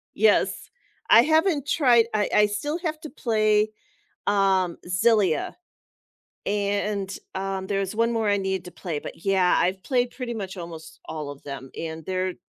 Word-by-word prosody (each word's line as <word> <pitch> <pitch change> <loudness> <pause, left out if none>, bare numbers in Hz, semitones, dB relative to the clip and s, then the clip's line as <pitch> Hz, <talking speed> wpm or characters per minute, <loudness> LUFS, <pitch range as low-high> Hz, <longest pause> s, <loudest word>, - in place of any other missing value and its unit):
Yes. 440 - +2 0.4
I 230 - +9
haven't 315 0 +2
tried 245 -7 +4
I 210 -1 +1
I 210 0 +6
still 290 +11 -3
have 315 -3 -3
to 310 - -8
play, 215 -4 +2 0.6
um, 190 -3 +2
Xillia. 185 -3 +2 0.9
And, 200 -1 -1 0.2
um, 190 0 -3
there's 195 0 -2
1 230 +2 +2
more 225 -2 0
I 205 - +3
need 190 -2 -2
to - - -8
play, 170 -3 -5
but - - -10
yeah, 190 -2 +3
I've 185 +2 0
played 245 0 +1
pretty 250 -2 -5
much 195 -4 -5
almost 165 -2 -9
all 150 -2 -5
of 145 -1 -11
them, 135 -2 -8
and 160 -1 -6
they're 185 -1 -1
200 Hz, 160 wpm, -25 LUFS, 185-230 Hz, 0.9 s, I